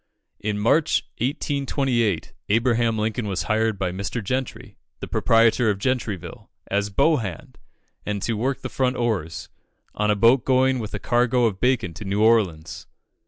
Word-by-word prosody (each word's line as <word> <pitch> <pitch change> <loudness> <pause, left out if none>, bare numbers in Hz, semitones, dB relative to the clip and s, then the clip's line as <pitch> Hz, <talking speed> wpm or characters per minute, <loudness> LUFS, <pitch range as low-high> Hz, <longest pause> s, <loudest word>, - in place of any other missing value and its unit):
In 105 0 -2
March, 120 +9 +2 0.2
1828, 135 - -1 0.2
Abraham 115 0 +2
Lincoln 110 +1 -2
was 95 -2 -2
hired 110 -1 0
by 90 -1 -1
Mr. 100 +5 -4
Gentry, 130 +4 -4 0.2
the - - -6
proprietor 115 0 +3
of 100 - 0
Gentryville, 110 -5 -3 0.2
as 100 +1 0
"bow 155 +10 +3
hand," 95 -9 -7 0.4
and 105 -1 -3
"to 115 - 0
work 125 +5 -2
the - - -4
front 130 -1 0
oars," 110 -10 -2 0.4
on 105 0 0
a 105 - +3
boat 115 +4 +4
going 130 0 +2
with 110 -2 -5
a - - -4
cargo 120 +2 +2
of 100 -4 -1
bacon 125 -9 +1
to 105 - -9
New 100 +2 0
Orleans. 95 -9 +1
115 Hz, 160 wpm, -23 LUFS, 100-125 Hz, 0.4 s, boat